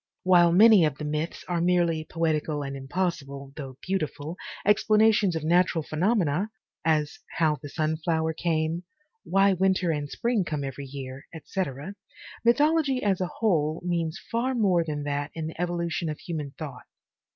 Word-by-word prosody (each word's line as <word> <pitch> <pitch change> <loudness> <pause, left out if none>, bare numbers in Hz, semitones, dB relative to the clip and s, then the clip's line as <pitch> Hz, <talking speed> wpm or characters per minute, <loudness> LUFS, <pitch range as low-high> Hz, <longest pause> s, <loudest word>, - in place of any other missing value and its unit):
While 175 -2 +6
many 210 +1 +7
of 150 -4 +1
the 150 - -5
myths 150 +2 -3
are 175 -1 0
merely 170 -2 +2
poetical 155 -3 -1
and 140 0 -5
impossible, 140 -2 -3
though 135 -4 -8
beautiful, 160 -4 -3 0.3
explanations 210 -2 +4
of 160 - -3
natural 170 0 +3
phenomena, 180 +2 +1 0.3
as 155 -2 +1 0.2
How 155 -3 +2
the 145 - -7
Sunflower 160 +1 0
Came, 160 0 -1 0.4
Why 195 +1 +3
Winter 185 -1 +2
and 145 -2 -3
Spring 235 +1 0
Come 150 -4 -3
Every 135 +1 -5
Year, 135 0 -8
etc., 160 0 -4 0.5
mythology 280 +2 +3
as 195 -3 +1
a 180 - 0
whole 160 -7 +1
means 170 -1 -1
far 250 +3 0
more 190 -7 +3
than 150 -2 -4
that 145 0 -2
in 160 -1 -3
the 160 - -5
evolu 175 -1 -1
tion 165 0 -2
of 150 - -4
human 150 -5 -5
thought. 140 -6 -8
165 Hz, 155 wpm, -26 LUFS, 150-185 Hz, 0.5 s, many